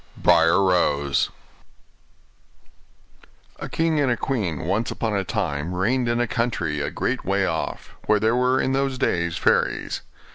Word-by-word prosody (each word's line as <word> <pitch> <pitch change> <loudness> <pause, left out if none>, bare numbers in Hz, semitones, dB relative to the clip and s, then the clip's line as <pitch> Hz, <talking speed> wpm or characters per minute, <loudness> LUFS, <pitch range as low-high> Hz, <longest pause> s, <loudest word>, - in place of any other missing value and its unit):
BRIAR 85 +2 +4
ROSE 75 -7 +2 2.3
A - - -6
king 160 -2 +1
and 125 -6 +1
queen 100 - -2
once 100 +8 -1
upon 110 -3 -2
a 100 - 0
time 75 0 -2
reigned 120 +6 +1
in 120 0 +1
a 120 - +2
country 95 -11 -1
a - - -1
great - - -2
way - - +1
off, - - -4
where 105 -1 +4
there 110 +3 +2
were 125 +1 +2
in 130 - 0
those 135 -1 0
days 85 -9 0
fairies. - - +1
105 Hz, 145 wpm, -23 LUFS, 85-125 Hz, 2.3 s, BRIAR